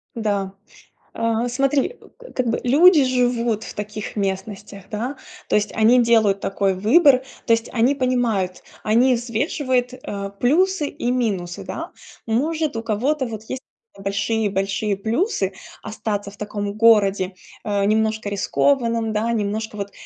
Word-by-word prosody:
Да. 200 -4 -1 0.6
А 230 +1 0
смотри, 275 - 0
э, - - -16
как 255 - -1
бы 230 - 0
люди 300 +4 +6
живут 245 -3 +1
в - - -8
таких 210 +1 -6
местностях, 195 0 -4
да. 240 +6 -3 0.3
То - - 0
есть 210 0 +1
они 230 +3 +5
делают 220 -4 +3
такой 195 0 0
выбор, 255 - +5 0.2
то 230 - +4
есть 230 0 +1
они 245 +4 +3
понимают, 240 -9 0 0.2
они 240 +4 +4
взвешивают, 250 +1 -1
э, 200 -5 -6
плюсы 320 +4 +2
и 245 - -3
минусы, 195 -8 -2
да. - - -6 0.4
Может, 300 +5 0
у 225 - -3
кого-то 255 +6 0
вот 220 -2 -7
есть 260 - -5 0.3
большие-большие 200 0 -1
плюсы 220 - -1 0.3
остаться 205 -2 -4
в - - -15
таком 205 -1 -4
городе, 200 -4 +4 0.3
э, 200 -1 0
немножко 220 0 +1
рискованным, 230 +2 +1
да. 215 +2 0
Немножко 215 0 -2
вот, 200 -1 -5
225 Hz, 140 wpm, -21 LUFS, 205-250 Hz, 0.6 s, люди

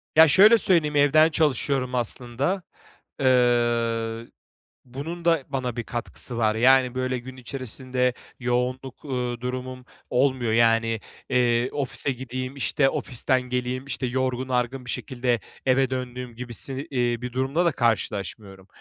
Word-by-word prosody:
Ya, 160 +1 +9
şöyle 210 +8 +7
söyleyeyim, 165 -8 +2
evden 145 +2 +5
çalışıyorum 135 -4 0
aslında. 125 - -2 0.6
Eee, 120 -3 +2 0.6
bunun 155 +7 -7
da 165 -5 +3
bana 130 -3 -3
bir 120 - -3
katkısı 120 +1 -3
var. 110 -2 +2
Yani, 130 +1 +4
böyle, 130 0 -1
gün 130 +2 -10
içerisinde 130 0 -2 0.3
yoğunluk, 125 +2 -2
uuu, 125 -3 -3
durumum 125 0 -5 0.2
olmuyor. 125 -2 +1
Yani, 115 -1 +3 0.3
eee, 120 -1 +2
ofise 140 0 -1
gideyim, 130 +1 -5
işte, 140 0 +1
ofisten 130 0 0
geleyim, 125 +1 -3
işte, 135 -2 -3
yorgun 130 0 -1
argın 125 +1 -1
bir - - -10
şekilde 125 -2 -1 0.3
eve 130 0 +3
döndüğüm 125 -2 -5
gibi 120 0 -7
si 135 +3 -3
iii, 120 -3 0
bir 125 -1 -5
durumla 135 +7 0
da 170 - +4
karşılaşmıyorum. 100 -5 -2
125 Hz, 135 wpm, -25 LUFS, 120-135 Hz, 0.6 s, Ya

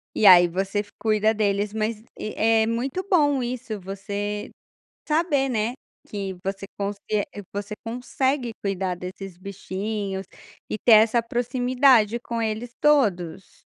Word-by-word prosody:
E 215 - +4
aí 175 -2 +9
você 195 +4 -2
f 205 0 -5
cuida 215 0 +2
deles, 205 -1 0
mas 220 0 -1 0.2
e, 215 - -4
é 225 0 +3
muito 260 +10 -2
bom 290 -7 +3
isso, 240 -3 -4
você 200 +2 -4 0.6
saber, 300 -3 +2
né, 225 -2 0 0.3
que 195 -2 -4
você 195 0 -3
consie 200 0 -3 0.5
você 205 +1 -5
consegue 250 +2 -1
cuidar 190 -2 -1
desses 180 +1 -8
bichinhos 195 0 -4 0.4
e - - -2
ter 235 - +4
essa 225 +2 +6
proximidade 245 -1 +3
com 235 -1 -3
eles 225 +2 -3
todos. 195 - +1
215 Hz, 130 wpm, -24 LUFS, 195-245 Hz, 0.6 s, aí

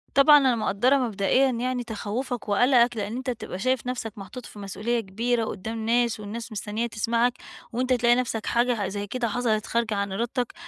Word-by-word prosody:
طبعًا 295 +2 +8
أنا 260 -4 +3
مقدرة 225 +5 +2
مبدئيًا 250 +2 +2
يعني 250 +1 -2
تخوفك 230 +1 -4
وقلقك، 240 +2 +4
لأن 210 +2 -3
أنتَ 260 0 -4
بتبقى 220 -6 -5
شايف 255 +3 0
نفسك 235 -4 -3
محطوط 235 +5 -9
في 210 - -11
مسئولية 210 +4 -2
كبيرة 225 +3 -1
قدام 220 +3 -5
ناس 235 -1 +2
والناس 225 +3 -6
مستنية 215 +2 -3
تسمعك، 230 +2 +1 0.4
وأنتَ 255 +2 +1
تلاقي 240 -1 +4
نفسك 235 -3 -2
حاجة 235 -3 +1
زي 205 +1 -4
كده 240 +2 -2
حصلت 220 -1 0
خارجة 230 -2 0
عن 200 -1 -2
إرادتك، 240 +4 -2
235 Hz, 175 wpm, -25 LUFS, 215-245 Hz, 0.4 s, طبعًا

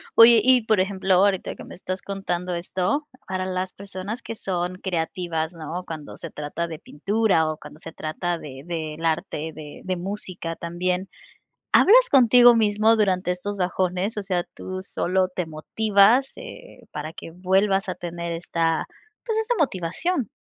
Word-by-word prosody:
Oye, 230 -1 +9
y 255 -2 +5
por 215 -3 +3
ejemplo, 190 0 +1
ahorita 190 +1 +3
que - - -11
me - - -10
estás 185 +1 -5
contando 180 -3 -3
esto. 185 - -1 0.2
Para 185 0 -2
las 185 0 -2
personas 200 +4 -7
que - - -5
son 185 -3 -3
creativas, 170 -2 -2
¿no?, 165 +2 -6
cuando 155 -3 -8
se 165 - -7
trata 150 +3 -4
de 160 -2 -7
pintura 195 0 +1
o 155 - -6
cuando - - -12
se 165 - -8
trata 170 +2 -3
de 135 -1 -9
del 160 -1 -4
arte, 160 0 -1
de 150 -2 -10
de 185 -1 -1
música, 180 -3 -4
también, 180 +2 -2 0.6
¿hablas - - +6
contigo 245 -2 +7
mismo 220 +1 +3
durante 185 -3 +1
estos 200 +3 -4
bajones, 185 +3 -1
o 205 - -2
sea, 180 -3 0
tú 185 0 -6
solo, 185 -1 0
te 180 -2 -3
motivas, 205 - +3
eh, 380 - -11
para 155 +2 -5
que 165 - -9
vuelvas 195 +2 +1
a 185 - -3
tener 170 -1 -5
esta, 165 -1 0 0.4
pues 445 -2 -1
esa 470 +2 0
motivación? 245 - -1
185 Hz, 160 wpm, -24 LUFS, 170-205 Hz, 0.6 s, Oye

